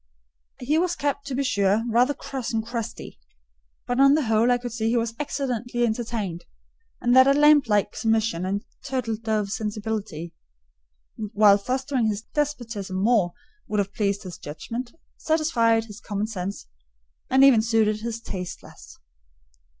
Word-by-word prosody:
He 295 Hz, +6 st, +1 dB
was 350 Hz, 0 st, 0 dB
kept, 285 Hz, -3 st, -2 dB
to 265 Hz, -, -3 dB
be 275 Hz, -, 0 dB
sure, 200 Hz, -3 st, +2 dB
rather 245 Hz, +5 st, +3 dB
cross 265 Hz, -2 st, -5 dB
and 220 Hz, -1 st, -1 dB
crusty; 230 Hz, -, -6 dB, 0.7 s
but 245 Hz, +1 st, -1 dB
on 275 Hz, +1 st, +7 dB
the 310 Hz, -, +1 dB
whole 225 Hz, 0 st, +2 dB
I 245 Hz, -, +4 dB
could 245 Hz, 0 st, -6 dB
see 225 Hz, 0 st, -1 dB
he 240 Hz, -, +2 dB
was 230 Hz, -1 st, -1 dB
excellently 245 Hz, -4 st, -1 dB
entertained, 220 Hz, -6 st, -3 dB, 0.6 s
and 245 Hz, +1 st, +2 dB
that 260 Hz, +1 st, +8 dB
a 275 Hz, -, +5 dB
lamb 295 Hz, 0 st, +6 dB
like 210 Hz, -2 st, +1 dB
submission 220 Hz, -5 st, 0 dB
and 200 Hz, +2 st, -2 dB, 0.2 s
turtle 255 Hz, -5 st, -2 dB
dove 215 Hz, -2 st, -2 dB
sensibility, 210 Hz, -6 st, -4 dB, 1.0 s
while 205 Hz, -1 st, +6 dB
fostering 255 Hz, +2 st, -1 dB
his 210 Hz, 0 st, -2 dB
despotism 240 Hz, -10 st, -2 dB
more, 200 Hz, -4 st, +2 dB, 0.3 s
would 210 Hz, -, -2 dB
have 200 Hz, 0 st, -1 dB
pleased 200 Hz, -1 st, -1 dB
his 180 Hz, -3 st, -8 dB
judgment, 230 Hz, +11 st, -6 dB, 0.3 s
satisfied 235 Hz, -8 st, +2 dB
his 210 Hz, -1 st, -11 dB
common 205 Hz, -2 st, -2 dB
sense, 200 Hz, -, -5 dB, 0.6 s
and 265 Hz, +1 st, +5 dB
even 265 Hz, -5 st, +7 dB
suited 220 Hz, -2 st, +1 dB
his 230 Hz, 0 st, -4 dB
taste 180 Hz, -5 st, -6 dB
less. -, -, -14 dB
225 Hz, 155 wpm, -24 LUFS, 210-255 Hz, 1.0 s, that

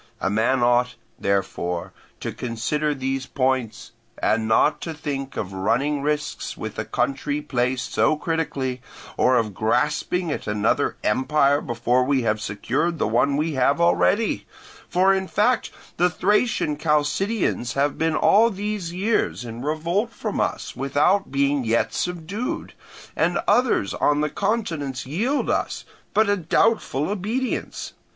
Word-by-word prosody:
A 95 Hz, -, 0 dB
man 115 Hz, +4 st, +2 dB
ought, 125 Hz, +1 st, +3 dB, 0.2 s
therefore, 90 Hz, -3 st, -1 dB, 0.3 s
to -, -, -3 dB
consider 145 Hz, +6 st, -2 dB
these 135 Hz, 0 st, -2 dB
points, 130 Hz, -4 st, -1 dB, 0.3 s
and 110 Hz, -1 st, +1 dB
not 110 Hz, +7 st, +3 dB
to 165 Hz, -2 st, -5 dB
think 140 Hz, -3 st, -5 dB
of 95 Hz, -2 st, -4 dB
running 135 Hz, +10 st, 0 dB
risks 150 Hz, +1 st, -2 dB
with -, -, -6 dB
a -, -, -2 dB
country 145 Hz, +2 st, -1 dB
placed 125 Hz, -3 st, -1 dB
so 155 Hz, -, +3 dB
critically, 145 Hz, -6 st, -2 dB, 0.3 s
or 130 Hz, -, +3 dB
of 110 Hz, -3 st, 0 dB
grasping 150 Hz, -, 0 dB
at -, -, -4 dB
another 105 Hz, -1 st, +1 dB
empire 140 Hz, +5 st, +2 dB
before 120 Hz, +2 st, +1 dB
we 135 Hz, -1 st, +1 dB
have 110 Hz, -1 st, 0 dB
secured 130 Hz, +11 st, -1 dB
the -, -, 0 dB
one 140 Hz, +6 st, +2 dB
we 155 Hz, +2 st, 0 dB
have 140 Hz, +2 st, +2 dB
already; 200 Hz, +5 st, +2 dB, 0.4 s
for 190 Hz, +2 st, +4 dB
in 190 Hz, -1 st, -1 dB
fact 225 Hz, +6 st, +1 dB, 0.3 s
the 180 Hz, +1 st, +4 dB
Thracian 195 Hz, -4 st, +1 dB
Chalcidians 150 Hz, -, 0 dB
have 140 Hz, +1 st, 0 dB
been 160 Hz, 0 st, +1 dB
all 220 Hz, +8 st, +5 dB
these 205 Hz, -4 st, -3 dB
years 190 Hz, -, 0 dB
in 115 Hz, 0 st, -7 dB
revolt 165 Hz, -, -1 dB
from 215 Hz, -3 st, -4 dB
us -, -, -2 dB
without 145 Hz, +9 st, +2 dB
being 140 Hz, 0 st, +1 dB
yet 115 Hz, 0 st, +1 dB
subdued, 180 Hz, +7 st, -3 dB, 0.4 s
and -, -, +1 dB
others 245 Hz, -, +2 dB
on 145 Hz, 0 st, +2 dB
the 150 Hz, -1 st, 0 dB
continents 165 Hz, -, -2 dB
yield 220 Hz, -, -1 dB
us -, -, -1 dB, 0.3 s
but 220 Hz, 0 st, +4 dB
a 205 Hz, -, +3 dB
doubtful 170 Hz, -4 st, +1 dB
obedience. 215 Hz, +6 st, -3 dB
145 Hz, 140 wpm, -23 LUFS, 125-180 Hz, 0.4 s, all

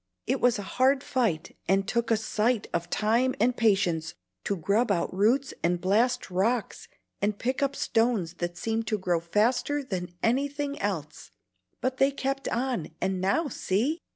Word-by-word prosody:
It 265 Hz, +2 st, 0 dB
was 245 Hz, -1 st, +4 dB
a 205 Hz, -, -5 dB
hard 265 Hz, +6 st, +2 dB
fight, 220 Hz, -12 st, -1 dB
and 195 Hz, +1 st, +2 dB
took 235 Hz, +1 st, 0 dB
a 225 Hz, -, +4 dB
sight 220 Hz, +1 st, 0 dB
of 170 Hz, 0 st, -2 dB
time 235 Hz, +4 st, +2 dB
and 240 Hz, +3 st, +3 dB
patience 190 Hz, -, +1 dB, 0.3 s
to 200 Hz, -, 0 dB
grub 205 Hz, +8 st, +1 dB
out 180 Hz, -2 st, 0 dB
roots 235 Hz, +8 st, +2 dB
and 175 Hz, +1 st, +1 dB
blast 225 Hz, +5 st, +1 dB
rocks 215 Hz, +6 st, -1 dB, 0.3 s
and 205 Hz, 0 st, 0 dB
pick 255 Hz, +5 st, -2 dB
up 280 Hz, 0 st, +1 dB
stones 225 Hz, -10 st, +1 dB
that 175 Hz, 0 st, -3 dB
seemed 225 Hz, 0 st, -2 dB
to 215 Hz, -, +1 dB
grow 180 Hz, -3 st, 0 dB
faster 245 Hz, -, +1 dB
than 180 Hz, -8 st, -5 dB
anything 285 Hz, +4 st, 0 dB
else. 160 Hz, -, -4 dB, 0.5 s
But 255 Hz, 0 st, -1 dB
they 270 Hz, +1 st, +4 dB
kept 275 Hz, 0 st, -3 dB
on, 240 Hz, -9 st, -1 dB
and 190 Hz, -1 st, -1 dB
now 200 Hz, -, +1 dB
see!" 265 Hz, -, -1 dB
225 Hz, 165 wpm, -27 LUFS, 190-255 Hz, 0.5 s, was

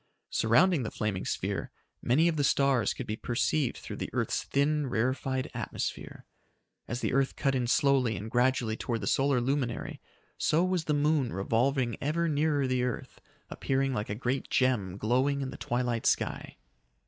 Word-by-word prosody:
Surrounding 140 Hz, +9 st, +3 dB
the 110 Hz, -, -3 dB
flaming 105 Hz, -3 st, -3 dB
sphere, 95 Hz, -2 st, -2 dB, 0.3 s
many 150 Hz, +8 st, +3 dB
of 170 Hz, -, +1 dB
the 145 Hz, -, 0 dB
stars 135 Hz, -4 st, +3 dB
could -, -, -5 dB
be 110 Hz, -, -3 dB
perceived 125 Hz, +4 st, 0 dB
through -, -, -7 dB
the -, -, -4 dB
earth's -, -, 0 dB
thin, 145 Hz, +1 st, +1 dB
rarefied 130 Hz, +2 st, -1 dB
atmosphere. -, -, -5 dB, 0.6 s
As 120 Hz, +2 st, -4 dB
the -, -, -1 dB
earth 135 Hz, 0 st, +1 dB
cut 135 Hz, -2 st, 0 dB
in 125 Hz, -2 st, 0 dB
slowly 130 Hz, -3 st, +3 dB
and 110 Hz, +2 st, -6 dB
gradually 125 Hz, -2 st, +2 dB
toward 115 Hz, 0 st, -3 dB
the -, -, -3 dB
solar 135 Hz, -1 st, +2 dB
luminary, 125 Hz, -1 st, -2 dB, 0.4 s
so 160 Hz, +3 st, +2 dB
was 185 Hz, -3 st, 0 dB
the 150 Hz, -, +1 dB
moon 145 Hz, -3 st, +2 dB
revolving 120 Hz, +4 st, 0 dB
ever 165 Hz, +4 st, 0 dB
nearer 150 Hz, -2 st, +1 dB
the 130 Hz, -1 st, 0 dB
earth, 125 Hz, -1 st, -4 dB, 0.3 s
appearing 135 Hz, 0 st, 0 dB
like 105 Hz, -2 st, -3 dB
a 100 Hz, -, -2 dB
great 125 Hz, +4 st, -2 dB
gem 105 Hz, -8 st, +1 dB
glowing 130 Hz, +6 st, +1 dB
in 130 Hz, -1 st, -3 dB
the -, -, -8 dB
twilight 120 Hz, -1 st, -1 dB
sky. -, -, -1 dB
130 Hz, 170 wpm, -29 LUFS, 120-140 Hz, 0.6 s, Surrounding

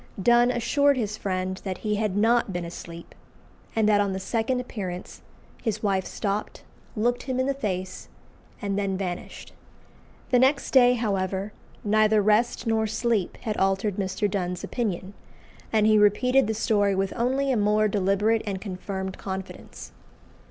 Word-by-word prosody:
Donne 240 Hz, +4 st, +4 dB
assured 280 Hz, +4 st, +2 dB
his 215 Hz, -3 st, -2 dB
friend 185 Hz, -2 st, -2 dB
that 190 Hz, -2 st, -3 dB
he 210 Hz, -, +1 dB
had 210 Hz, -2 st, -1 dB
not 225 Hz, 0 st, +3 dB
been 175 Hz, -1 st, -3 dB
asleep, 170 Hz, 0 st, -9 dB, 0.6 s
and 220 Hz, -1 st, +3 dB
that 205 Hz, -1 st, +4 dB
on 200 Hz, -1 st, 0 dB
the 190 Hz, -, -3 dB
second 230 Hz, +5 st, -1 dB
appearance 190 Hz, -7 st, -6 dB, 0.4 s
his 215 Hz, -2 st, -2 dB
wife 195 Hz, -2 st, 0 dB
stopped, 205 Hz, 0 st, -3 dB, 0.3 s
looked 240 Hz, +3 st, 0 dB
him 260 Hz, -1 st, -3 dB
in 260 Hz, -, +2 dB
the 275 Hz, -, +1 dB
face, 185 Hz, -8 st, -4 dB, 0.5 s
and 200 Hz, 0 st, -1 dB
then 195 Hz, -2 st, -1 dB
vanished. 180 Hz, -2 st, -6 dB, 0.8 s
The 250 Hz, -, +5 dB
next 270 Hz, +2 st, +2 dB
day, 250 Hz, -2 st, +6 dB
however, 195 Hz, -3 st, -2 dB, 0.3 s
neither 215 Hz, +1 st, +3 dB
rest 215 Hz, +4 st, +2 dB
nor 220 Hz, -1 st, +1 dB
sleep 220 Hz, -3 st, -1 dB
had 215 Hz, -3 st, -2 dB
altered 195 Hz, +1 st, +1 dB
Mr. 190 Hz, +1 st, -1 dB
Donne's 180 Hz, -3 st, -3 dB
opinion, 200 Hz, -5 st, -3 dB, 0.6 s
and 215 Hz, -1 st, +3 dB
he 215 Hz, 0 st, +5 dB
repeated 250 Hz, +6 st, +4 dB
the 220 Hz, -, -1 dB
story 205 Hz, -2 st, +2 dB
with 195 Hz, 0 st, -1 dB
only 265 Hz, +3 st, +1 dB
a -, -, +2 dB
more 210 Hz, 0 st, +3 dB
deliberate 205 Hz, +2 st, +1 dB
and 195 Hz, -3 st, -3 dB
confirmed 190 Hz, -1 st, -5 dB
confidence. 190 Hz, -1 st, -7 dB
210 Hz, 155 wpm, -25 LUFS, 190-230 Hz, 0.8 s, day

